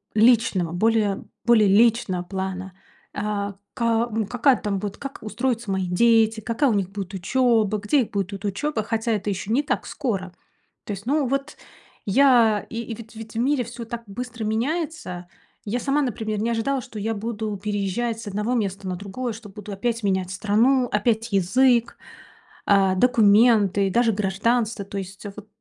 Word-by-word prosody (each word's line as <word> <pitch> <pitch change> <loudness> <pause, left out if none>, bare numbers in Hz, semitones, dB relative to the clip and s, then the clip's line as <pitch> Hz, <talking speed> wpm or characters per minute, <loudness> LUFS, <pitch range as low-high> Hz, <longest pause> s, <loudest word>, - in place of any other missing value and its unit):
личного, 220 -6 +3
более 210 +1 +1 0.2
более 225 -4 +5
личного 210 -3 +3
плана. 190 0 -5 0.4
А 205 -1 -3 0.2
ка 230 0 +1 0.2
какая 250 +1 +3
там 205 -2 -2
будет 200 0 -5
как 275 -1 -7
устроятся 235 -1 -2
мои 190 -1 -1
дети, 225 +4 +3
какая 240 +6 +1
у - - +2
них 195 -3 0
будет 200 -1 -6
учёба, 220 +1 +2
где 210 +8 +2
их 230 - -4
будет 200 -1 -2
ут 195 +1 -7
учёба. 220 +4 -1
Хотя 225 +2 -1
это 210 -1 -2
ещё 195 +1 -3
не 275 - +3
так - - -2
скоро. 195 -10 -3 0.5
То - - -5
есть 200 +1 -8
ну 285 +2 +1
вот, 275 +3 -2 0.5
я 230 -2 +4
и 230 +1 -5
ведь 225 0 -12
ведь 220 0 -10
в - - -1
мире 265 +1 +2
всё 235 0 -8
так 235 +1 -6
быстро 235 +2 -6
меняется. 240 - -2 0.4
Я 240 +4 0
сама, 280 +3 +1
например, 220 -5 -2
не 230 - 0
ожидала, 255 +4 0
что 245 -4 -11
я 220 +2 -1
буду 215 0 -4
переезжать 210 +3 -2
с 230 - -9
одного 210 +4 -1
места 200 -4 -2
на 185 - -2
другое, 205 +6 -5
что 210 0 -11
буду 210 +1 -8
опять 230 +4 -2
менять 190 -2 0
страну, 225 +7 +2
опять 220 +2 0
язык, 235 +6 +3 0.7
а 195 -2 +4
документы, 210 -2 +4
и - - -2
даже 230 +1 +3
гражданство. 210 +2 0
То 200 +1 -7
есть 195 +2 -9
вот 210 0 -10
220 Hz, 170 wpm, -23 LUFS, 200-240 Hz, 0.7 s, более